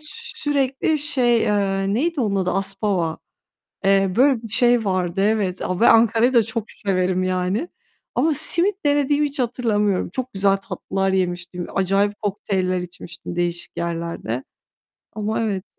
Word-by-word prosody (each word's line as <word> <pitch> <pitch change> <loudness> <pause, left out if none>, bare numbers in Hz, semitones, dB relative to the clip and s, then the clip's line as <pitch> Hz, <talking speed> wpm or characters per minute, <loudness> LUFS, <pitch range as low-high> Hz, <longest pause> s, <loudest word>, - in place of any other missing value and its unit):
sürekli 290 -1 -1
şey, 250 -5 +2
eee, 195 -2 0
neydi 320 +4 0
onun 205 -4 0
adı? 185 -2 0
Aspava, 195 -3 -1 0.7
eee, 195 -1 +3
böyle 260 0 +4
bir 225 - -7
şey 240 0 +3
vardı 185 -1 0
evet, 200 -3 +1
ve 185 +5 +1
Ankara'yı 230 +2 +4
da 235 -2 +5
çok 220 +1 -3
severim 185 -2 0
yani 185 - -1 0.5
ama, 320 0 +2
simit 345 +5 +1
denediğimi 290 0 +2
hiç 285 0 -9
hatırlamıyorum. 220 -5 0
Çok 255 +6 -5
güzel 195 0 +2
tatlılar 195 0 -2
yemiştim. 180 -1 -2
Acayip 195 +2 +1
kokteyller 190 -3 -1
içmiştim 175 0 -8
değişik 175 0 -3
yerlerde 170 -8 -3 0.7
ama 215 +2 -1
evet. 200 -4 -2
200 Hz, 135 wpm, -22 LUFS, 185-245 Hz, 0.7 s, da